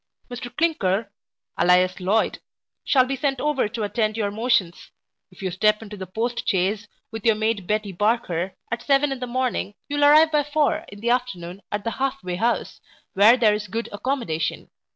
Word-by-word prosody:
Mr 245 0 -6
Clinker, 210 - +1 0.5
alias 180 +1 +3
Loyd, 200 +4 +1 0.4
shall 260 -3 +4
be 270 +1 -2
sent 270 0 -1
over 295 -5 +1
to 225 0 -4
attend 215 +1 -1
your 205 -2 -1
motions 220 -5 0 0.4
If - - -14
you 185 - -1
step 210 +4 +2
into 210 -1 -9
the 190 -2 -7
post 235 +5 -2
chaise, 200 +3 0 0.2
with 225 -2 -7
your 225 -2 +4
maid 215 -3 -1
Betty 210 -1 -1
Barker, 190 -3 -1 0.2
at 235 - -2
seven 280 0 +2
in 270 - -3
the 250 - -4
morning, 245 -4 -2
you 290 - -3
will 290 - +4
arrive 310 +2 +6
by 300 -1 +3
four 305 +2 0
in 200 0 -12
the 235 +1 +1
afternoon 200 -7 -2
at 205 0 -2
the 230 - -2
half 270 0 -1
way 180 -1 -3
house, 235 +4 -1 0.3
where 215 +5 +6
there 220 -4 +4
is 210 0 -3
good 225 +5 -4
accommodation. 205 - -3
225 Hz, 190 wpm, -23 LUFS, 200-255 Hz, 0.5 s, arrive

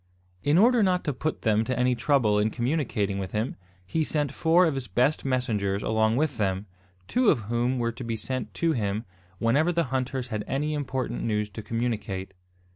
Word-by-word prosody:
In 145 - +3
order 235 +4 +5
not 185 -3 +2
to 145 - -1
put 155 +5 -3
them 110 -1 +3
to 130 +2 -2
any 125 0 +3
trouble 115 -4 +2
in 105 +1 +2
communicating 120 -6 -1
with 95 -2 -5
him, 110 +3 -1 0.3
he 160 - 0
sent 150 -3 -1
four 165 +5 +4
of 160 - +1
his 135 -3 -4
best 125 +10 +1
messengers 105 -7 0
along 110 0 +2
with 145 -1 0
them, 95 -1 0 0.4
two 250 -3 +3
of 130 - +3
whom 120 +4 0
were 115 -1 0
to 120 +2 -8
be 115 -1 -2
sent 120 -1 -4
to 165 -1 +1
him 105 -4 -1 0.3
whenever 140 - +2
the 170 -1 +1
hunters 130 -1 -2
had 110 -2 -2
any 150 +3 -1
important 130 -4 -2
news 105 -1 -1
to 110 - -7
communicate. 105 -5 -3
120 Hz, 195 wpm, -27 LUFS, 110-145 Hz, 0.4 s, order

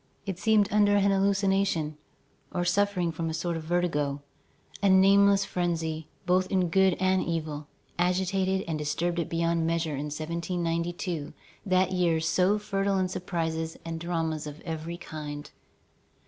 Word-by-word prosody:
It 190 -3 -4
seemed 215 -1 +4
under 205 -1 +4
an 200 0 +3
hallucination, 195 -5 +1 0.6
or 175 -1 -1
suffering 180 -1 +1
from 165 0 -3
a 160 - -3
sort 170 0 -2
of 165 - -3
vertigo. 150 -5 0 0.6
A 200 - +4
nameless 195 +1 +5
frenzy, 160 -3 -2 0.2
both 185 +1 +2
in 185 -3 +2
good 190 +1 +3
and 185 0 +2
evil, 155 -3 -3 0.3
agitated 190 +2 +1
and 160 -2 -2
disturbed 170 +4 -1
it 170 - -2
beyond 165 0 +1
measure 165 -2 0
in 140 +1 -3
1792, 170 +1 -3 0.3
that 185 0 +3
year 175 -3 +2
so 180 +5 +2
fertile 195 -1 0
in 185 -1 +1
surprises 165 -3 -3
and 165 -1 -4
dramas 160 -3 -2
of 150 +1 -8
every 165 +1 -5
kind. 150 -3 -7
175 Hz, 145 wpm, -28 LUFS, 160-190 Hz, 0.6 s, nameless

